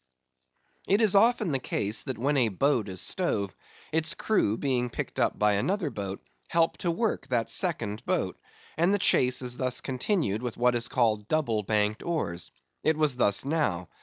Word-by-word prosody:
It 200 - +3
is 220 -4 +4
often 215 -2 +4
the 135 - 0
case 105 -3 -2
that 130 - -4
when 140 +5 0
a 125 -5 +3
boat 115 0 0
is 95 -1 -4
stove, 100 - -1 0.4
its 160 0 +1
crew, 115 - +1
being 125 -3 0
picked - - -5
up - - +1
by 105 0 +3
another 170 - -1
boat, 100 -3 -6 0.2
help 165 -1 +2
to 175 - -1
work 215 +7 -1
that 120 -3 -1
second 115 - -1
boat; 170 - -1 0.4
and 170 +4 +3
the 205 - +3
chase 125 -8 +3
is 125 0 -2
thus 125 -1 -1
continued 130 - -1
with 120 -2 -5
what 125 +1 +3
is 120 0 0
called 110 -6 +1
double 130 -8 0
banked 105 +1 0
oars. 90 - -3 0.3
It 155 -1 +2
was 150 -4 +3
thus 105 0 +3
now. 140 - -1
125 Hz, 180 wpm, -27 LUFS, 105-165 Hz, 0.4 s, is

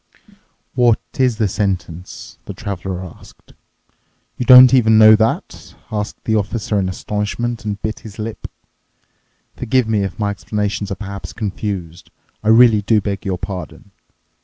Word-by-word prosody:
"What 120 -3 +3 0.2
is 125 -4 +2
the 110 - +1
sentence?" 95 -3 -4
the 100 - -8
Traveler 95 -2 -5
asked. 85 - -16 0.8
"You 125 - -4
don't 130 0 +9
even 110 -4 +5
know 110 0 +8
that?" 110 +1 -2 0.2
asked 105 0 -4
the 110 - 0
Officer 105 0 -1
in 95 -1 -1
astonishment 105 +5 -4
and 105 -1 -3
bit 110 - -3
his 110 -2 -12
lip. 110 0 -6 1.1
"Forgive 130 0 0
me 110 -2 +1
if 95 -2 -4
my 105 -1 -1
explanations 105 0 -3
are - - -2
perhaps 100 0 -8
confused. 95 -5 -5 0.3
I - - -4
really 110 -1 +6
do 110 +1 +2
beg 100 -1 -4
your 95 -2 -1
pardon. 90 0 -8
105 Hz, 145 wpm, -18 LUFS, 95-110 Hz, 1.1 s, don't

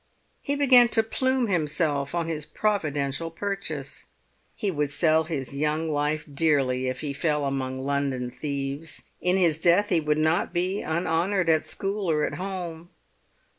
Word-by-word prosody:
He 285 - -1
began 255 -4 +6
to 225 - +5
plume 260 +3 +1
himself 150 -5 0
on 170 -1 0
his 160 -2 -3
providential 155 -7 -1
purchase. 195 +4 -4 0.5
He 205 - -1
would 150 -3 -1
sell 160 +2 +2
his 140 -5 -4
young 155 +3 0
life 150 +1 -1
dearly 135 -4 +2
if 130 - -3
he 145 -2 -3
fell 150 0 0
among 130 -1 -2
London 135 -2 -1
thieves; 140 +2 -4 0.2
in 180 +1 +2
his 165 -4 +2
death 180 +5 +4
he 175 - +3
would 150 -1 0
not 155 +2 +1
be 185 +3 0
unhonoured 170 +3 0
at 155 -1 +3
school 195 +4 -2
or 150 -2 +2
at - - -4
home. 175 -3 -5
160 Hz, 155 wpm, -26 LUFS, 145-180 Hz, 0.5 s, began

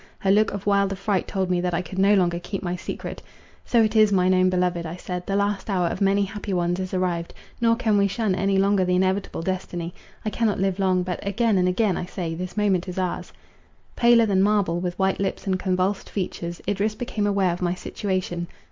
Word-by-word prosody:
Her 195 - +1
look 210 +1 +4
of 200 -1 -6
wild 200 -1 +2
affright 195 0 -1
told 190 -2 -1
me, 175 -1 +1
that 180 -1 -1
I 175 - -1
could 185 +3 -6
no 200 +2 +5
longer 175 -3 +2
keep 195 +2 -5
my 175 -1 -2
secret:—"So 225 +5 -3
it 215 +1 0
is, 215 -1 +5
mine 185 -1 +3
own 185 0 +4
beloved," 180 -1 0
I 165 +1 -5
said, 180 0 -6
"the 195 - 0
last 200 +1 0
hour 185 -3 +1
of - - -5
many 200 +1 +3
happy 200 0 -5
ones 175 0 0
is 185 -1 -4
arrived, 180 -2 -2 0.3
nor 230 -1 +4
can 220 -4 +2
we 200 - +4
shun 210 0 0
any 195 +1 +1
longer 195 0 +3
the 180 0 +1
inevitable 190 -2 0
destiny. 175 -2 -3 0.3
I 215 - -1
cannot 220 -4 0
live 195 0 0
long—but, 185 -2 +1
again 200 0 +1
and 180 - +2
again, 190 +1 +1
I - - -3
say, 170 -3 -4
this 180 +3 -6
moment 195 -3 +1
is 180 - -7
ours!" 185 -2 -2 0.6
Paler 235 -1 +5
than 195 -3 +2
marble, 200 -4 +2
with 180 0 -3
white 190 0 +1
lips 195 -1 -2
and 190 -1 0
convulsed 185 +1 -1
features, 175 -3 -4
Idris 205 +2 0
became 215 -3 -2
aware 195 -3 +2
of 175 - -7
my 175 0 0
situation. 185 -2 -3
190 Hz, 220 wpm, -24 LUFS, 180-200 Hz, 0.6 s, no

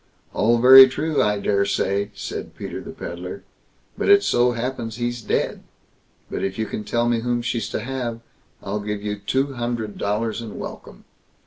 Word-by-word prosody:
"All 115 +2 +3
very 130 +2 +10
true, 155 +4 0
I 105 -1 +2
daresay", 100 0 0
said 420 0 -6
Peter - - -6
the - - -10
Pedlar; - - -7 0.5
"but - - -1
it 405 0 +7
so 120 0 +3
happens 115 -2 -4
he's 120 0 -3
dead; - - -1 0.7
but - - -4
if 95 0 -2
you 110 - -1
can 105 - -5
tell 120 +2 0
me 120 -1 +2
whom 120 0 -1
she's 115 -3 -2
to - - -3
have, 120 -3 -4 0.4
I'll 100 +1 -3
give 105 0 -4
you 105 0 -3
two 135 +7 -1
hundred 120 -3 -4
dollars, 110 +3 -1
and 115 -3 -8
welcome." - - -9
115 Hz, 175 wpm, -22 LUFS, 105-125 Hz, 0.7 s, very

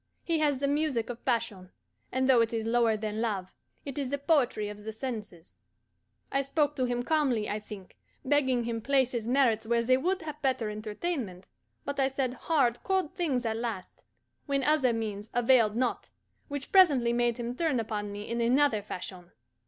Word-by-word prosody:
He 330 -2 0
has 295 -3 +2
the 280 +2 -1
music 280 -5 0
of 240 - -10
passion, 225 -7 -1 0.4
and 260 +1 +1
though 255 -3 +6
it 230 0 0
is 225 -1 -1
lower 230 -1 +2
than 215 0 -3
love, 200 -5 -2 0.3
it 280 0 -4
is 270 -3 -2
the 285 - -1
poetry 275 -8 +1
of 210 0 -8
the 220 - -5
senses. 215 -8 -7 0.7
I 275 - +2
spoke 290 +1 0
to 255 - +1
him 245 0 -1
calmly, 260 -7 +1
I 210 - -2
think, 210 -3 -11 0.3
begging 260 -3 +2
him 230 -1 -3
place 265 0 +2
his 230 -2 -3
merits 240 -4 +2
where 235 0 +2
they 255 +2 +4
would 365 +6 -1
have 305 -1 -7
better 260 -6 0
entertainment; 215 - -4 0.4
but 280 0 -3
I 265 - +4
said 265 -2 -2
hard, 255 -3 +1
cold 380 -5 0
things 295 -10 -1
at 220 -1 -1
last, 225 -6 -5 0.4
when 275 -1 0
other 290 -3 +3
means 215 -2 -4
availed 235 -3 +4
not; 250 +1 -1 0.4
which 285 -2 -6
presently 280 -11 +5
made 240 0 +1
him 240 0 -4
turn 310 -4 +1
upon 210 -2 -3
me 205 +1 -7
in 235 0 -2
another 245 -1 +3
fashion. 180 -3 -7
245 Hz, 185 wpm, -29 LUFS, 220-280 Hz, 0.7 s, though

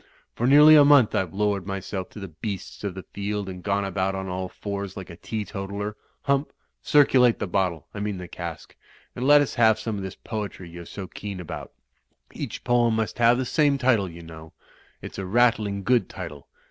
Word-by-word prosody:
For 120 - -1
nearly 150 +3 +8
a 150 - +8
month 140 -5 +6
IVc 95 - 0
lowered 100 -1 -1
myself 95 -1 -4
to - - -11
the 95 -2 -7
beasts 95 +6 -6
of 100 -3 -3
the 95 - -8
field, 100 0 -3
and 90 -1 -7
gone 100 +1 0
about 95 0 -1
on 95 0 -4
all 95 0 -4
fours 100 -1 -5
like 95 -2 -8
a - - -9
teetotaler. 100 +1 -5 0.3
Htunp, 140 +1 +2 0.3
circulate 130 -5 +4
the - - -2
bot 95 0 +1
tle 80 -4 -11
— - - -45
I 105 - -6
mean 105 -1 -2
the 90 -1 -7
cask^* 85 -1 -7 0.4
and 125 +1 -2
let 145 0 +8
us 145 - -1
have 110 -3 +4
some 110 -1 -4
of - - -4
this 95 -1 -6
poetry 100 -5 -6
you're 85 0 -9
so 100 - -7
keen 100 +1 -7
^^1^ 90 -3 -7 0.6
£^ch - - -6
poem 120 -2 +3
must 110 +1 -2
have 120 +1 +5
the 130 - -1
same 145 +1 +2
title, 120 -8 +2
you 85 0 -11
know^rs 80 +3 -13
a 95 - -3
rattling 105 -2 +2
good 125 +4 +2
tide. 90 -4 -6
100 Hz, 205 wpm, -25 LUFS, 95-120 Hz, 0.6 s, nearly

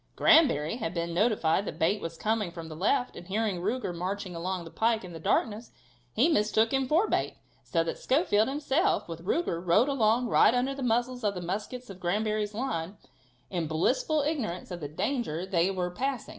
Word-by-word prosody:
Granbury 230 - +4
had 185 -7 -4
been 170 0 -2
notified 200 -2 +2
that - - -6
Bate 200 +6 +1
was 165 0 -6
coming 215 -2 0
from 165 -1 -8
the 155 - -7
left, 245 - 0
and 175 - -10
hearing 200 -2 -1
Ruger 210 -1 -2
marching 185 +1 -4
along 180 +1 -3
the 165 - -10
pike 225 -1 +1
in 175 - -9
the 165 - -7
darkness, 215 +7 0 0.4
he 245 - +3
mistook 220 -6 +2
him 270 -1 +1
for 335 +10 +3
Bate, - - -1 0.3
so 165 -3 0
that 165 - -4
Schofield 255 - +2
himself, 285 - 0
with 165 0 -7
Ruger, 180 - -1
rode 210 +10 +3
along 240 -2 +2
right 230 - +5
under 255 +2 +1
the 275 - -7
muzzles 245 +1 0
of 205 -2 0
the - - -3
muskets 210 +7 -5
of 190 - -11
Granbury's 210 +3 -1
line, 205 -7 -3 0.5
in 170 -4 -1
blissful 255 - +1
ignorance 245 - -3
of 175 - -5
the 150 - -5
danger 185 - -2
they 185 -1 +1
were 180 -2 -2
passing. 260 +5 -3
210 Hz, 195 wpm, -28 LUFS, 175-250 Hz, 0.5 s, right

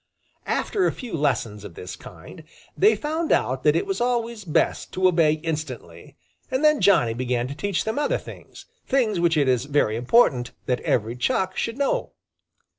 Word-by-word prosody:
After 390 -4 0
a - - +1
few 245 -4 -9
lessons 120 -8 -1
of 85 - -10
this 90 - -7
kind, - - -13 0.3
they 215 +3 +4
found 310 +8 -2
out - - +1
that - - +3
it - - +1
was 390 -7 -3
always 235 -3 -1
best 155 - 0
to 185 0 +3
obey 165 -4 +3
instantly, 140 - -6 0.3
and 260 +3 -1
then 305 -2 +4
Johnny 170 - +4
began 125 0 -1
to - - -4
teach 195 +4 -1
them 220 +5 -2
other 295 - +1
things, - - -12 0.2
things 235 -8 +1
which 170 -2 +2
it 145 -3 +2
is 125 -1 +1
very 140 -7 +1
important 125 - +2
that 125 -1 0
every 115 +1 0
Chuck 185 +9 0
should 230 +2 -3
know. 280 -1 -1
165 Hz, 180 wpm, -24 LUFS, -, 0.3 s, they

